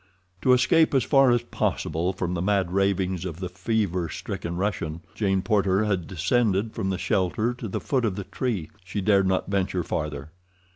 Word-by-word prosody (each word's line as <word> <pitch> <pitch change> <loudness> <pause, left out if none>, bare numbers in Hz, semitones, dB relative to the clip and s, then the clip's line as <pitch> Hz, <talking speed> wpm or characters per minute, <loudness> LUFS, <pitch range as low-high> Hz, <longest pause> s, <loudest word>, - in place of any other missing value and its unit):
To 130 - +3
escape 155 +4 +4
as 130 - +4
far 135 0 +5
as 120 -1 +3
possible 85 -6 -1
from 90 -2 -3
the 85 - -2
mad 95 -2 +1
ravings 95 -2 +1
of 85 -3 -5
the 90 -1 -4
fever 95 -2 -1
stricken 85 +2 -5
Russian, 85 -5 -2
Jane 95 -3 0
Porter 100 0 +2
had 95 -5 -1
descended 100 +4 +1
from 95 - -2
the 95 - -1
shelter 95 +5 0
to 120 -2 -6
the 95 - -3
foot 130 -4 0
of 100 -4 -1
the 100 - -4
tree—she 100 -3 -4
dared 100 -1 +3
not 95 +1 0
venture 95 -2 0
farther. 75 -2 -4
95 Hz, 180 wpm, -25 LUFS, 90-110 Hz, -, far